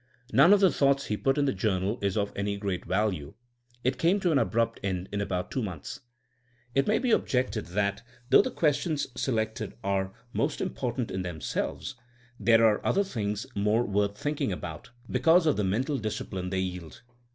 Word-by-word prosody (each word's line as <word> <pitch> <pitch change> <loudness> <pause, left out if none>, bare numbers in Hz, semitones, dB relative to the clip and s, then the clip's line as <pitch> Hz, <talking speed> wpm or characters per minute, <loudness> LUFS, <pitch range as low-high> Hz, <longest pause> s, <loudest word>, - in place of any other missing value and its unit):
None 140 +8 +7
of 205 -1 +6
the 190 -3 +6
thoughts 140 -1 +2
he 105 - -1
put 135 +6 +1
in 145 - +3
the 135 - +1
journal 95 +1 0
is 100 0 0
of 100 -1 -1
any 100 0 -2
great 100 -3 -3
value. 95 -7 -1 0.5
It 130 +1 0
came 180 +5 +3
to 175 - +2
an 145 - +4
abrupt 115 -3 0
end 95 -2 -2
in 100 - -2
about 90 -3 -2
two 130 - -1
months. 90 -9 -6 0.7
It 135 - +2
may 215 - +3
be 255 -2 0
objected 125 - +1
that 100 +3 -1 0.3
though - - +9
the - - -2
questions 155 - 0
selected 110 -3 -2
are 95 -1 0 0.2
most 140 +2 0
important 125 -2 -2
in 95 - -2
themselves, 90 - -3 0.5
there 115 +2 +5
are 105 -2 +3
other 200 - +2
things 105 - -3
more 105 +4 +2
worth 100 -2 0
thinking 145 -5 -1
about, 90 -3 -6 0.2
be - - -1
cause 165 +1 +5
of 155 - +3
the 105 - 0
mental 130 +9 0
discipline 95 -4 -4
they 95 0 0
yield. 90 -3 -6
110 Hz, 185 wpm, -28 LUFS, 95-135 Hz, 0.7 s, though